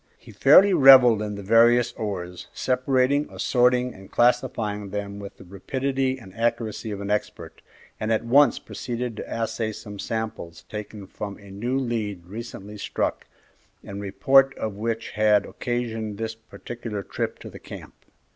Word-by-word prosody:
He - - -15
fairly 200 0 +6
revelled 130 - +8
in 105 -1 -4
the 100 - -7
various 120 +3 +4
ores, 90 -5 -5
separating, 130 +2 +1
assorting, 125 0 +2
and 95 0 -14
classifying 115 -4 +1
them 100 0 -5
with 100 -1 -9
the - - -13
rapidity 130 +7 -2
and 95 -7 -14
accuracy 115 -1 -2
of 100 -1 -5
an 100 0 -3
expert, 105 - -4 0.4
and 110 +1 -2
at 110 +1 0
once 140 +2 +5
proceeded 120 -1 -5
to - - -7
assay 115 -1 -2
some 105 -2 -9
samples 110 -8 -5
taken 105 -1 -7
from 100 +1 -7
a 100 -1 -14
new 120 +7 -2
lead 110 -8 -3
recently 105 0 -8
struck, - - -2 0.6
the - - -9
report 100 +8 +3
of 110 -2 -3
which 115 +2 -3
had 105 -1 +3
occasioned 115 -4 -4
this 115 0 -3
particular 115 -2 -7
trip - - -4
to - - -10
the - - -11
camp. - - -10
110 Hz, 155 wpm, -24 LUFS, 100-125 Hz, 0.6 s, revelled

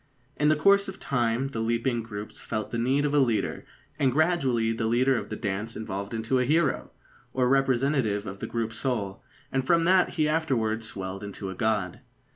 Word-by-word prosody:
In 150 +1 +2
the 155 - +5
course 200 +6 +4
of 190 - -7
time 120 0 0
the 115 - -5
leaping 115 +1 0
groups 105 -2 -7
felt 110 -2 -4
the 115 - -2
need 135 +5 +2
of 145 - 0
a 145 - +5
leader, 120 -5 0 0.3
and 135 -3 +3
gradually 135 -7 +2
the 110 0 -1
leader 130 +4 +3
of 105 -4 -3
the - - -4
dance 105 +2 -3
evolved 100 0 -5
into 115 +4 0
a - - +3
hero, 150 +2 +1 0.4
or 125 -1 +2
representative 130 -5 +2
of 95 0 -7
the - - -4
group 115 -1 -2
soul, 110 -6 -2 0.3
and 135 0 0
from 165 +5 +3
that 185 +1 +3
he 155 -3 +2
afterwards 115 -8 0
swelled 95 0 -5
into 100 -1 -6
a - - -5
god. 105 -3 -1
120 Hz, 195 wpm, -27 LUFS, 110-140 Hz, 0.4 s, the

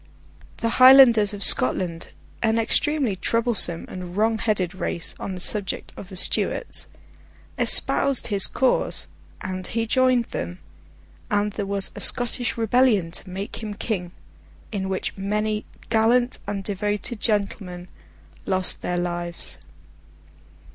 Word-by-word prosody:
The 230 - -2
Highlanders 255 -5 +7
of 205 -1 -6
Scotland, 165 +6 +2 0.3
an 225 0 +1
extremely 265 0 0
troublesome 215 -3 0
and 180 0 -8
wrong 220 +1 +1
headed 195 -6 -1
race 170 -3 -3
on 190 - -5
the - - -7
subject 200 +1 +2
of 195 - -11
the 190 - -10
Stuarts, 180 - 0 0.7
espoused 275 -2 +4
his 200 -3 +4
cause, 260 -1 0 0.3
and 185 -1 -5
he 230 0 -2
joined 255 0 +2
them, 180 - -5 0.7
and 205 -1 0
there 205 -2 -4
was 200 -1 0
a - - -9
Scottish 245 0 +1
rebellion 225 -6 +2
to 185 - -8
make 195 +4 -7
him 210 -2 -6
king, 185 -5 -4 0.6
in 190 -3 -4
which 190 - -3
many 210 +2 -2 0.3
gallant 240 +3 +2
and 200 -1 -4
devoted 205 +3 -3
gentlemen 195 -4 -2 0.6
lost 185 -1 +1
their 180 - -3
lives. 175 - -3
205 Hz, 125 wpm, -23 LUFS, 185-230 Hz, 0.7 s, Highlanders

